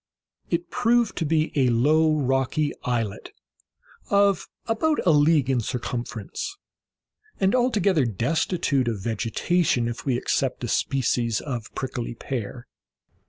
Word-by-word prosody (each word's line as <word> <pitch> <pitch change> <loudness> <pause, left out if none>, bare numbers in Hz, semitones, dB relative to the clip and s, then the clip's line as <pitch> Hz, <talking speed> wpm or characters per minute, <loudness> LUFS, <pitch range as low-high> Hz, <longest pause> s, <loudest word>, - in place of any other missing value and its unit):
It 170 0 -2
proved 240 -2 +2
to 165 - 0
be 155 0 +1
a 130 -3 +3
low 155 +7 +3
rocky 135 +2 0
islet, 115 -5 -3 0.8
of 200 -2 +3 0.2
about 295 +7 +1
a 175 - +5
league 150 -2 +4
in 130 -3 +1
circumference, 120 - -4 0.8
and 190 0 +2
altogether 205 - +2
destitute 135 - 0
of 115 -3 -1
vegetation, 120 - 0
if 120 0 -5
we 130 -3 0
except 130 0 -1
a - - -1
species 120 -4 0
of 120 -6 -5
prickly 125 -3 -4
pear. 120 0 -5
135 Hz, 120 wpm, -24 LUFS, 120-170 Hz, 0.8 s, a